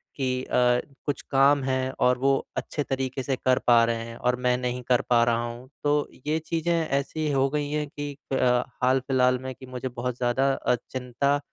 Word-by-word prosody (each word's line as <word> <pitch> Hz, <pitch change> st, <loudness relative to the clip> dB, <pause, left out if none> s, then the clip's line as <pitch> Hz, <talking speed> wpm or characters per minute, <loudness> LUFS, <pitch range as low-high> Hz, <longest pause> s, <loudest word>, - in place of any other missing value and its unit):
कि 130 Hz, -2 st, -1 dB
अ, 125 Hz, -1 st, +3 dB, 0.3 s
कुछ 145 Hz, -, -2 dB
काम 140 Hz, +1 st, +5 dB
है 130 Hz, 0 st, 0 dB
और 125 Hz, 0 st, +3 dB
वो 135 Hz, +2 st, +2 dB, 0.3 s
अच्छे 145 Hz, -, -2 dB
तरीक़े 130 Hz, -1 st, -3 dB
से 135 Hz, -, 0 dB
कर 130 Hz, 0 st, +2 dB
पा 120 Hz, -1 st, +7 dB
रहे 115 Hz, 0 st, -1 dB
हैं 115 Hz, -, -8 dB
और 125 Hz, 0 st, +1 dB
मैं 125 Hz, 0 st, +3 dB
नहीं 125 Hz, 0 st, -3 dB
कर 125 Hz, -1 st, +4 dB
पा 120 Hz, -1 st, +5 dB
रहा 120 Hz, 0 st, +1 dB
हूँ। 120 Hz, +2 st, -8 dB
तो 145 Hz, 0 st, +2 dB, 0.2 s
ये 155 Hz, +1 st, +2 dB
चीज़ें 165 Hz, +1 st, -2 dB, 0.2 s
ऐसी 140 Hz, +3 st, -1 dB
हो 135 Hz, 0 st, +2 dB
गई 145 Hz, 0 st, -2 dB
हैं 150 Hz, -1 st, -1 dB
कि 145 Hz, 0 st, -5 dB, 0.2 s
अ, -, -, +2 dB, 0.5 s
हाल-फिलहाल 130 Hz, 0 st, +3 dB
में 130 Hz, 0 st, -6 dB
कि 130 Hz, -, -12 dB
मुझे 130 Hz, 0 st, -5 dB
बहुत 125 Hz, 0 st, -4 dB
ज़्यादा 130 Hz, +3 st, +2 dB
अ, 125 Hz, -, +1 dB, 0.2 s
चिंता 130 Hz, +3 st, 0 dB
130 Hz, 200 wpm, -26 LUFS, 125-140 Hz, 0.5 s, पा